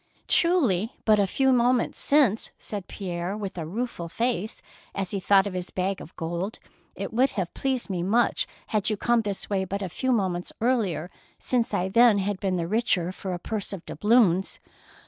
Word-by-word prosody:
"Truly, 255 - +3
but 215 -2 +5
a 200 - +3
few 265 +6 +2
moments 245 0 +2
since,'' 270 -7 +3
said 205 -3 -6
Pierre, 180 0 -4
with 200 -3 -5
a 165 -3 -4
rueful 200 -3 -4
face, 225 -1 -2 0.3
as 195 -2 -2
he 200 - -1
thought 195 +1 +4
of 200 - -4
his 180 -1 -4
bag 190 +1 -2
of 165 - -12
gold. 170 +6 -3 0.2
" - - -37
It - - -5
would 255 +4 +3
have 180 -3 -2
pleased 265 -2 -1
me 185 -3 -2
much 220 +7 +2 0.2
had 215 -2 +1
you 215 - -1
come 240 +2 +2
this 205 -3 -4
way 195 -2 0
but 200 +2 -3
a 185 - -3
few 260 +9 -1
moments 185 -6 0
earlier, 200 - 0 0.3
since 245 -3 0
I 190 -3 0
then 230 +2 +5
had 200 0 -1
been 190 -1 0
the 170 -2 -1
richer 185 -4 +1
for 190 0 -6
a - - -4
purse 205 +3 -4
of 185 -3 -7
doubloons." 210 -5 +2
200 Hz, 195 wpm, -26 LUFS, 185-235 Hz, 0.3 s, but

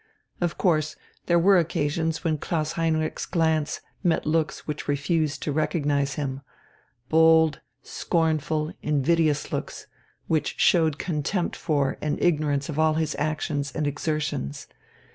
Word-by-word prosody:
Of 175 -1 -1
course 155 -4 +1 0.3
there 170 - +4
were 185 +2 +5
occasions 160 0 -1
when 160 -3 0
Klaus 155 -1 -1
Heinrich's 160 -2 -1
glance 160 -3 0 0.2
met 170 -3 +1
looks 155 0 0
which 150 -1 -5
refused 145 0 0
to 150 - -1
recognize 145 -2 0
him 135 -2 -3 0.7
bold, 160 0 +5 0.2
scornful, 155 -2 -1
invidious 150 +1 +1
looks, - - -4 0.4
which 155 -3 0
showed 160 -4 +4
contempt 170 +3 -2
for 145 -5 0
and 150 -1 -1
ignorance 150 -4 +1
of 155 -1 -4
all 155 0 +3
his 155 -1 -1
actions 150 -2 -2
and 155 - -1
exertions. 145 - -2
155 Hz, 125 wpm, -25 LUFS, 145-165 Hz, 0.7 s, were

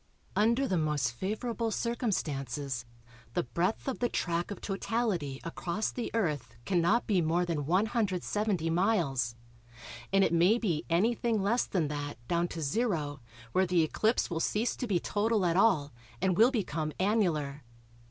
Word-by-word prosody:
Under 235 +6 +3
the 185 -6 +1
most 150 -6 0
favourable 225 - -2
circumstances 150 - -2 0.5
the - - +2
breadth 170 - -1
of 265 - -2
the 245 - +1
track 170 0 -1
of 205 - -6
totality 195 - -2
across 175 +5 -2
the 245 - -4
Earth 145 - -1
cannot 185 +5 +2
be 195 -5 +2
more 170 +2 +1
than 155 -5 -2
170 200 -2 0
miles, 160 - +1 0.8
and 195 0 +5
it 170 - +2
may 175 +7 +5
be 175 -10 -1
anything 225 +5 +2
less 235 +5 +2
than 170 -6 0
that 145 -1 -4
down 170 0 +1
to 165 -2 -5
zero 150 - -1 0.3
where 185 +6 +2
the 175 -2 +3
eclipse 220 +9 +1
will 165 - -3
cease 215 +7 0
to 250 - -4
be 190 -5 +2
total 210 +1 +1
at 170 -1 +2
all, 180 - +3 0.3
and 185 -1 +2
will 225 +6 +6
become 165 - -2
annular. 170 -9 +1
180 Hz, 150 wpm, -30 LUFS, 155-220 Hz, 0.8 s, will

